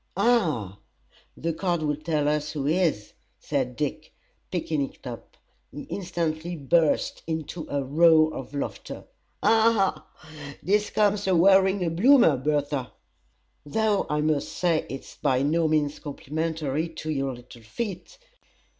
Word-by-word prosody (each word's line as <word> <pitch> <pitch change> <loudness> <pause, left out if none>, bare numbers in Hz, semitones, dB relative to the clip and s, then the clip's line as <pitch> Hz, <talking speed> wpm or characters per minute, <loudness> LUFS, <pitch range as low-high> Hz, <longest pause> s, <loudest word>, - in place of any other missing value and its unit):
"Ha! 160 - +1 0.6
the 165 +1 -2
card 175 -1 -1
will 150 -1 0
tell 155 -1 -1
us 150 0 -1
who 145 -3 -3
he 155 +3 +2
is," 165 - 0 0.3
said 130 -4 -2
Dick, 150 +2 -4 0.4
picking 160 -4 -1
it 135 - -6
up. 120 -2 -9 0.3
He 145 - -8
instantly 175 -2 -3
burst 155 +1 +1
into 160 0 -4
a 140 -1 -1
roar 155 +2 +4
of 135 +2 -7
laughter. 140 - -5 0.4
"Ha! 225 -3 +3 0.2
ha! 150 -3 -11
This 210 +2 +1
comes 205 -1 +1
of 185 -2 +3
wearing 190 +1 +4
a 165 - 0
Bloomer, 230 - +5
Bertha! 145 -1 -1 0.7
Though 210 +7 0
I 150 0 0
must 150 -2 0
say 170 -3 0
it's 135 - -8
by 130 0 +1
no 160 +3 +2
means 150 -2 0
complimentary 155 +1 -3
to 155 -1 -5
your 135 -3 -2
little 120 -1 -14
feet. 200 - -6
155 Hz, 140 wpm, -26 LUFS, 145-175 Hz, 0.7 s, Bloomer